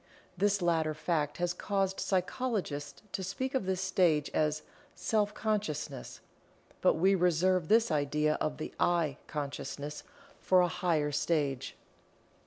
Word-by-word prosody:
This 200 0 +1
latter 160 -3 +1
fact 150 -2 -1
has 175 0 0
caused 195 +1 -1
psychologists 185 - -2
to - - -3
speak 200 +8 -3
of 260 -8 -1
this 190 -1 0
stage 165 -6 +2
as 155 0 +1 0.3
"Self 210 -2 +1
consciousness," 155 - -3 0.6
but - - +4
we 190 +4 +4
reserve 180 -1 +2
this 225 0 +4
idea 150 +1 +1
of 155 - -1
the 155 - -6
"I" 165 -5 +2
consciousness 145 0 -5 0.4
for 185 -1 +4
a 180 - +3
higher 170 -4 0
stage. 145 -3 -1
175 Hz, 130 wpm, -31 LUFS, 150-190 Hz, 0.6 s, but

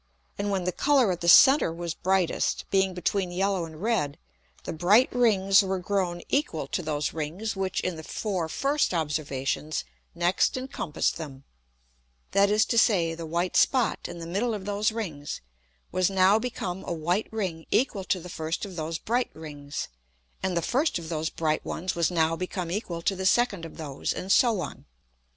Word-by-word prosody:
And 205 0 -1
when 195 -2 0
the 180 - 0
Colour 260 +2 +3
at 175 - -4
the 170 - -2
center 265 - +7
was 170 0 -4
brightest, 190 -1 0
being 190 -1 +2
between 180 +1 -1
yellow 190 -1 0
and 160 +2 -10
red, 215 -12 0 0.5
the - - -4
bright 195 +10 +4
Rings 205 -5 +4
were 190 -1 -1
grown 180 -2 -1
equal 295 +2 0
to 185 - -1
those 150 -3 -2
Rings 165 +8 -3
which 190 -1 -1
in 180 -3 -3
the 160 - -8
four 185 -3 -3
first 275 - +1
Observations 150 -1 -2 0.3
next 175 +8 +2
encompassed 255 - -2
them; 140 -4 -8 0.9
that 200 0 +4
is 210 +1 +4
to 230 - +2
say, 175 -9 +3
the 165 0 -6
white 170 +3 -1
Spot 250 -6 +3
in 175 - -8
the 165 - -7
middle 210 +7 -1
of 195 -2 -7
those 205 +2 +1
Rings 165 -11 -5 0.5
was 185 0 +2
now 195 +2 +4
become 205 -6 -4
a - - -5
white 175 +6 0
Ring 185 -7 -3
equal 220 -5 +1
to 185 - 0
the 180 - -9
first 160 +1 -3
of 190 -3 -9
those 160 0 -3
bright 240 +7 0
Rings, 145 -2 -6 0.5
and 185 -2 -1
the 170 - 0
first 275 - +1
of 165 -2 -7
those 160 -1 -1
bright 155 -1 -1
ones 185 +2 -3
was 170 -1 +1
now 165 -2 +2
become 180 0 -4
equal 175 -4 -3
to 195 - +1
the 190 0 0
second 205 -6 +2
of 165 - -11
those, 145 -4 -3
and 190 - -4
so 225 -3 +4
on. 150 - -7
180 Hz, 185 wpm, -27 LUFS, 165-205 Hz, 0.9 s, center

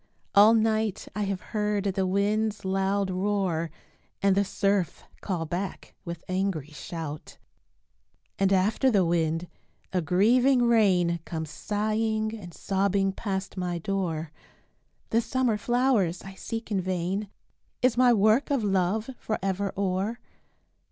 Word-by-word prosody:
All 210 +3 +7
night 220 -2 +1
I 210 -1 0
have 195 -2 -3
heard 210 -2 0
the 195 -1 0
wind's 210 +2 0
loud 195 +1 0
roar, 185 -4 0 0.5
And 195 -1 +3
the 200 - +3
surf 195 -3 0 0.2
call 175 -5 -2
back 180 +5 -5
with 170 -1 -6
angry 185 -6 -1
shout. 150 0 -7 1.0
And 195 0 +3
after 205 +7 +3
the 200 -7 +3
wind 165 0 0 0.5
a 180 - +2
grieving 240 - +4
rain 190 -8 +3
Comes 160 -3 -5
sighing 215 +1 -1
and 185 -6 -9
sobbing 195 +2 0
past 195 -1 -4
my 180 -1 -2
door, 165 -4 -2 0.8
"The 230 - +3
summer 255 -2 +1
flowers 240 -7 +1
I 195 - -9
seek 225 +3 -6
in 195 -2 +1
vain, 185 +3 -2 0.5
Is 255 -2 +4
my 250 0 +5
work 220 +5 +3
of 275 -6 +1
love 200 +4 0
forever 195 -2 -2
o'er?" 200 +4 -1
195 Hz, 130 wpm, -27 LUFS, 180-215 Hz, 1.0 s, All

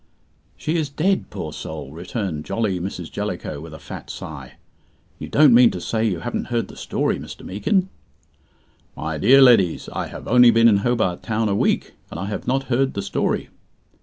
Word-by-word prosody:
"She 160 +3 -1
is 155 -3 -1
dead, 185 +7 0
poor - - -6
soul," 75 -3 -7
returned 85 -1 -4
jolly 105 -3 -1
Mrs. 95 +3 -6
Jellicoe, 70 - -4
with 80 0 -10
a 80 - -9
fat - - -9
sigh. - - -8 0.7
"You - - -6
don't 145 -4 +6
mean 120 0 +7
to 90 - -5
say 110 +5 -2
you 95 -7 0
haven't 120 - -3
heard 120 -2 -2
the - - -11
story, - - -1
Mr. - - -10
Meekin?" 180 - 0 1.1
"My 80 -1 -4
dear 135 - +7
leddies, 105 -10 +4
I - - -3
have - - -9
only 125 0 +7
been 115 0 +5
in 105 -3 +5
Hobart 100 -5 0
Town 110 -1 -1
a 100 - +1
week, - - 0 0.2
and 80 - -7
I 95 - -3
have 105 +1 -5
not 135 +2 +1
heard 135 +1 0
the 100 - -2
story." - - -1
110 Hz, 190 wpm, -22 LUFS, 90-125 Hz, 1.1 s, mean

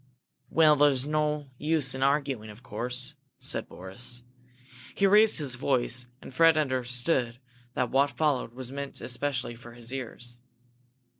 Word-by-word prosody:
"Well, 155 -2 +5
there 145 +1 +6
is 135 -1 +2
no 150 -2 -1
use 150 -3 +1
in 130 - -5
arguing, 135 -5 0
of 105 +4 -13
course," 125 +4 -4 0.2
said - - -1
Boris. 120 +7 -6 0.7
He 200 - +2
raised 210 +2 +6
his 145 -6 +1
voice, 125 -1 +2 0.2
and - - -10
Fred 165 +2 +5
understood 125 -2 0 0.4
that 125 -4 0
what 140 +1 +3
followed 140 -6 -1
was 130 -1 -5
meant 140 0 -5
especially 125 0 -2
for 120 0 -12
his 120 +1 -6
ears. 120 -2 -7
130 Hz, 145 wpm, -28 LUFS, 120-145 Hz, 0.7 s, there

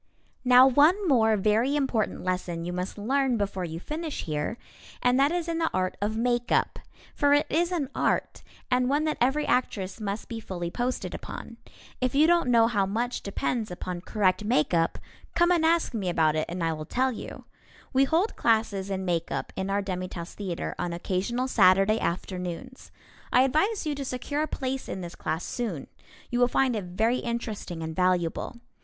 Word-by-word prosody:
Now 250 0 +8
one 310 +10 +4
more 225 -6 +4
very 220 +7 +2
important 265 -7 0
lesson 180 -2 -2
you 175 - -3
must 180 +3 -4
learn 260 +3 +1
before 195 -3 -2
you 165 0 -5
finish 310 - -4
here, 155 +8 -3 0.4
and 250 +1 +3
that 280 +2 +4
is 345 -1 -1
in 335 -1 -1
the 325 - +1
art 185 0 0
of 215 +2 -1
makeup. 240 +1 +1 0.3
For 285 0 +4
it 290 - +2
is 345 +3 +2
an 320 -6 -1
art, - - 0 0.3
and 250 0 +3
one 290 +2 +2
that 310 -1 -1
every 270 +5 +2
actress 200 -6 -1
must 205 +1 -3
be 230 -2 -5
fully 175 -5 -5
posted 250 +4 -2
upon. - - -8 0.4
If 255 +1 0
you 300 +2 +6
don't 340 -5 +3
know 230 -2 +6
how 205 -4 +1
much 235 +5 -2
depends 220 +2 -2
upon 180 0 -5
correct 195 0 +1
makeup, 170 -6 +2 0.4
come 345 +1 +4
and 340 -2 +3
ask 330 -2 +2
me 200 -5 -1
about 160 -3 +2
it 155 - -1
and 175 0 -3
I 165 -1 +1
will 155 -1 -6
tell 260 +9 +1
you. 230 - -8 0.5
We 270 +1 +5
hold 335 +10 +1
classes 220 -4 +1
in 190 -1 -2
makeup 170 -2 -2
in 190 0 -3
our 200 +1 0
Demi 185 -2 -3
Tasse 170 -1 -7
Theatre 185 -5 -4
on 175 -1 -2
occasional 195 +9 -1
Saturday 195 -1 +4
afternoons. 180 +7 -4 0.4
I 250 - +6
advise 320 - +1
you 300 - 0
to 280 -1 -4
secure 270 +3 -3
a 310 - 0
place 265 -2 -3
in 190 - -4
this 175 -1 -7
class 160 +2 -3
soon. 215 - -3 0.5
You 245 - 0
will 245 - +5
find 255 0 +2
it 205 -4 -3
very 220 +8 +1
interesting 220 -8 -4
and 160 0 -5
valuable. 180 +3 0
225 Hz, 185 wpm, -27 LUFS, 185-265 Hz, 0.5 s, Now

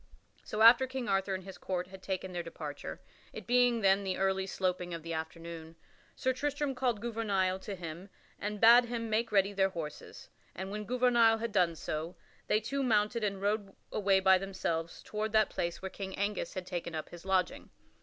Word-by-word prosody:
So 215 +1 0
after 240 +3 +8
King 260 -1 -4
Arthur 195 -1 +1
and 185 - -6
his 190 0 -10
court 180 -1 -2
had 190 0 -11
taken 190 -1 -3
their 175 - -2
departure 150 -4 -7 0.3
it - - -8
being 245 -1 +3
then 195 -1 +5
in - - -7
the 190 -1 -2
early 190 0 +1
sloping 180 -2 -2
of 165 - -8
the 165 0 -4
afternoon 165 0 -6 0.4
Sir 260 - 0
Tristram 290 +1 -1
called 245 -5 0
Gouvernail 200 -5 0
to 200 +1 -6
him 175 +2 -8 0.3
and 210 0 -3
bade 235 +3 +8
him 230 -2 -4
make 225 +1 +1
ready 200 -1 +3
their 195 -1 +2
horses, 165 -5 -7 0.3
and 190 +1 -5
when 210 +1 -4
Gouvernail 240 -1 +4
had 230 0 -3
done 180 -5 +2
so, 160 +2 -4 0.3
they 215 - +3
two 260 +6 -2
mounted 220 -2 +2
and 200 -2 -2
rode 205 -1 -1 0.2
away 195 -2 +3
by 190 -1 +5
themselves 170 -4 -3
toward 215 0 -3
that 215 -1 +4
place 170 +2 -3
where 190 - -4
King 190 -1 -6
Angus 200 -3 -2
had 185 -1 -4
taken 175 -2 -4
up 155 - -5
his 175 -1 -11
lodging. 190 -2 0
195 Hz, 195 wpm, -32 LUFS, 180-225 Hz, 0.4 s, after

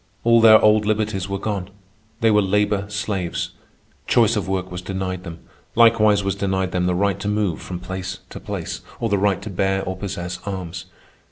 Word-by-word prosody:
All 115 0 +5
their 110 -1 +8
old 105 0 +4
liberties 105 -3 -1
were 100 - -1
gone. 100 -2 -3 0.5
They 115 -1 +4
were 105 0 +5
labor 105 +1 +1
slaves. 105 -4 -2 0.6
Choice 115 -1 +4
of 105 - -2
work 95 -1 -2
was 90 0 -5
denied 95 -1 -4
them. 85 -3 -9 0.3
Likewise 110 -3 +5
was 100 0 0
denied 95 -2 -1
them 90 -1 0
the 90 - +1
right 100 0 +1
to - - -4
move 105 -6 0
from 90 -1 -6
place 95 0 -6
to - - -7
place, - - -5 0.2
or 115 - -1
the 100 -1 +2
right 100 -1 +1
to 105 - -6
bear 95 +1 0
or 95 0 -3
possess 90 -2 -5
arms. 95 -4 -5
100 Hz, 190 wpm, -22 LUFS, 95-105 Hz, 0.6 s, their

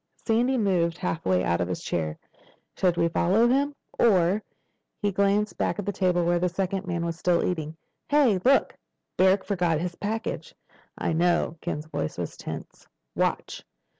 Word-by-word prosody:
Sandy 245 +3 +2
moved 175 -6 +1
halfway 155 - 0
out 85 0 +1
of 90 - 0
his 90 -2 -4
chair. 80 -2 -2 0.6
"Should 180 -2 +1
we 170 0 +3
follow 190 +7 +3
him? 280 +3 +1 0.2
Or—" 195 -2 +4 0.6
He 205 -1 0
glanced 200 +2 +1
back - - 0
at 205 - -4
the 205 - 0
table 180 -3 +1
where 175 0 +2
the 180 +1 +1
second 190 +1 -2
man 170 -1 -2
was 165 0 -4
still 175 -1 +2
eating. 160 -3 -3 0.3
"Hey—look! 270 -4 +3 0.4
Barrack 190 +1 +4
forgot 175 -6 0
his 175 +1 -3
package." 220 +5 -4 0.4
"I - - -1
know." 170 0 +2
Ken's 150 - -4
voice 80 - -4
was - - -4
tense. - - -8 0.3
"Watch." - - -1
180 Hz, 160 wpm, -26 LUFS, 170-205 Hz, 0.6 s, Or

